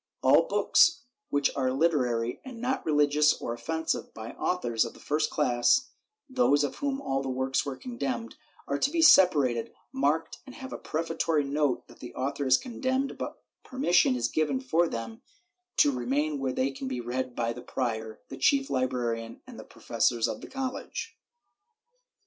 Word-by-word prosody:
All -, -, +5 dB
books 325 Hz, -9 st, +4 dB, 0.3 s
which 145 Hz, 0 st, +1 dB
are 130 Hz, -2 st, 0 dB
literary 125 Hz, -6 st, 0 dB
and 255 Hz, -3 st, -9 dB
not 255 Hz, +2 st, -1 dB
rehgious 150 Hz, 0 st, +3 dB
or 115 Hz, -, -3 dB
offensive, 160 Hz, +7 st, -3 dB
by 110 Hz, 0 st, -7 dB
authors 120 Hz, -11 st, 0 dB
of 115 Hz, -, -7 dB
the -, -, -15 dB
first 150 Hz, +1 st, 0 dB
class 135 Hz, -, +2 dB, 0.4 s
(those 250 Hz, -, +3 dB
of 145 Hz, -, -3 dB
whom 275 Hz, -1 st, -2 dB
all 135 Hz, -, -1 dB
the 135 Hz, -, -4 dB
works 130 Hz, +2 st, -1 dB
were 135 Hz, -, -3 dB
condemned), 240 Hz, -, -4 dB, 0.3 s
are 140 Hz, 0 st, -1 dB
to -, -, +2 dB
be 330 Hz, +1 st, +1 dB
separated, 145 Hz, -, +5 dB, 0.2 s
marked 150 Hz, +4 st, 0 dB
and 260 Hz, -, -10 dB
have 265 Hz, 0 st, -8 dB
a -, -, -6 dB
prefatory 165 Hz, -1 st, -1 dB
note 140 Hz, -2 st, -1 dB
that -, -, -17 dB
the 125 Hz, -, -10 dB
author 140 Hz, +1 st, -2 dB
is 130 Hz, 0 st, +6 dB
condemned, 260 Hz, +2 st, -2 dB
but -, -, -6 dB, 0.2 s
permission 180 Hz, -, +2 dB
is 120 Hz, -1 st, 0 dB
given 145 Hz, 0 st, 0 dB
for 160 Hz, +7 st, +1 dB
them 115 Hz, -4 st, -6 dB, 0.6 s
to 145 Hz, -, +5 dB
remain 140 Hz, +4 st, -1 dB
where 135 Hz, -1 st, -1 dB
they 130 Hz, +2 st, 0 dB
can 135 Hz, 0 st, -6 dB
be 130 Hz, -1 st, -3 dB
read 125 Hz, +1 st, -3 dB
by 115 Hz, 0 st, -1 dB
the 125 Hz, -, -9 dB
prior, 110 Hz, -4 st, -4 dB
the 135 Hz, -, -7 dB
chief 275 Hz, -, +2 dB
librarian 120 Hz, -3 st, -2 dB
and -, -, -11 dB
the -, -, -8 dB
professors 120 Hz, -2 st, 0 dB
of -, -, -5 dB
the -, -, -9 dB
college. 270 Hz, -, -5 dB
140 Hz, 170 wpm, -28 LUFS, 125-180 Hz, 0.6 s, is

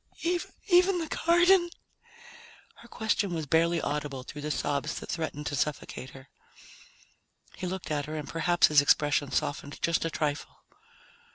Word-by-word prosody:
"Even 365 Hz, 0 st, +5 dB
the 325 Hz, -3 st, -4 dB
garden?" 345 Hz, +1 st, +5 dB, 1.1 s
Her 235 Hz, -, -15 dB
question 215 Hz, -5 st, -1 dB
was 160 Hz, -2 st, -3 dB
barely 165 Hz, +3 st, +2 dB
audible 145 Hz, -3 st, -3 dB
through 150 Hz, +3 st, -9 dB
the 150 Hz, -, -4 dB
sobs 145 Hz, +1 st, -1 dB
that -, -, -7 dB
threatened 155 Hz, -3 st, -4 dB
to 145 Hz, -, -2 dB
suffocate 135 Hz, -3 st, -3 dB
her. 130 Hz, +1 st, -14 dB, 1.3 s
He 185 Hz, -, -5 dB
looked 185 Hz, -2 st, -5 dB
at 145 Hz, -2 st, -1 dB
her 155 Hz, -, -5 dB
and 150 Hz, -2 st, -5 dB
perhaps 175 Hz, +1 st, +3 dB
his 150 Hz, -2 st, +5 dB
expression 145 Hz, 0 st, +2 dB
softened 145 Hz, 0 st, -2 dB
just 170 Hz, -1 st, +1 dB
a 165 Hz, -, -1 dB
trifle. 150 Hz, -2 st, -3 dB
155 Hz, 150 wpm, -28 LUFS, 145-185 Hz, 1.3 s, Even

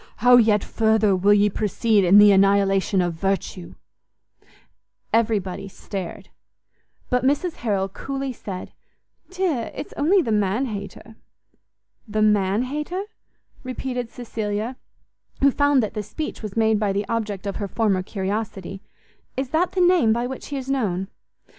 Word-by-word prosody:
How 245 Hz, +2 st, +6 dB
yet 215 Hz, -3 st, +4 dB
further 220 Hz, -3 st, +2 dB
will 200 Hz, +3 st, +4 dB
ye 205 Hz, 0 st, +4 dB
proceed 210 Hz, +1 st, +1 dB
in 185 Hz, +3 st, +6 dB
the 205 Hz, 0 st, +8 dB
annihilation 195 Hz, -1 st, +3 dB
of 175 Hz, -1 st, -1 dB
virtue!" 190 Hz, 0 st, -3 dB, 1.4 s
Everybody 200 Hz, -4 st, 0 dB
stared; 195 Hz, 0 st, -7 dB, 0.8 s
but 250 Hz, 0 st, +2 dB
Mrs 290 Hz, +6 st, 0 dB
Harrel 200 Hz, -5 st, -1 dB
coolly 270 Hz, +6 st, -5 dB
said, 190 Hz, -5 st, -8 dB, 0.6 s
"Dear, 360 Hz, -11 st, -1 dB
it's -, -, -7 dB
only 350 Hz, +6 st, +3 dB
the 230 Hz, -, -2 dB
man 210 Hz, +4 st, +1 dB
hater!" 215 Hz, 0 st, -8 dB, 0.9 s
"The 215 Hz, 0 st, 0 dB
man 205 Hz, +1 st, +2 dB
hater?" 300 Hz, +8 st, -3 dB, 0.6 s
repeated 255 Hz, -2 st, -4 dB
Cecilia, 220 Hz, 0 st, -4 dB, 0.7 s
who 275 Hz, 0 st, +5 dB
found 285 Hz, -2 st, +3 dB
that 215 Hz, -, -3 dB
the 210 Hz, -, -3 dB
speech 300 Hz, +10 st, -6 dB
was 215 Hz, -1 st, -7 dB
made 220 Hz, -1 st, +3 dB
by 210 Hz, -2 st, +1 dB
the 200 Hz, +1 st, -2 dB
object 210 Hz, -4 st, -3 dB
of 200 Hz, -, -3 dB
her 200 Hz, -, -3 dB
former 200 Hz, -3 st, +1 dB
curiosity; 195 Hz, -1 st, -4 dB, 0.6 s
"is 265 Hz, -1 st, -2 dB
that 330 Hz, +5 st, 0 dB
the 370 Hz, -, +1 dB
name 350 Hz, -11 st, +4 dB
by 235 Hz, +1 st, -1 dB
which 260 Hz, +1 st, -6 dB
he 285 Hz, -, -4 dB
is 265 Hz, -1 st, -6 dB
known?" 200 Hz, -9 st, -1 dB
215 Hz, 145 wpm, -23 LUFS, 195-255 Hz, 1.4 s, the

